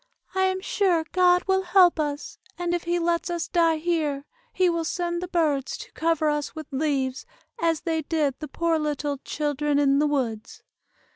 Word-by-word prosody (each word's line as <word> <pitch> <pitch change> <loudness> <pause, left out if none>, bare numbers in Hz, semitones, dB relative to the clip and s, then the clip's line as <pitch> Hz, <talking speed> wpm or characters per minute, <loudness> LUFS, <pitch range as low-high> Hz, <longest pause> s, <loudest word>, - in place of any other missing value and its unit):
"I 380 0 +2
am 375 0 0
sure 370 -5 +1
God 360 -1 +4
will 380 0 +2
help 360 -2 +4
us, 295 -1 -3 0.2
and 350 -1 -1
if 350 -1 -2
he 345 +1 +1
lets 340 +1 0
us 345 -1 -2
die 335 -2 +3
here, 310 -4 -1 0.3
he 370 - +2
will 335 -1 0
send 345 +1 -2
the 365 - -4
birds 310 -7 0
to - - -10
cover 325 -1 0
us 295 0 -1
with 315 -1 -6
leaves, 270 -2 -1 0.3
as 330 -2 +1
they 325 -2 -1
did 300 -2 0
the 305 - -6
poor 335 0 0
little 290 -2 -2
'children 295 0 -1
in 280 -1 +3
the 300 - +3
woods. 235 -6 -3
325 Hz, 185 wpm, -25 LUFS, 290-345 Hz, 0.3 s, God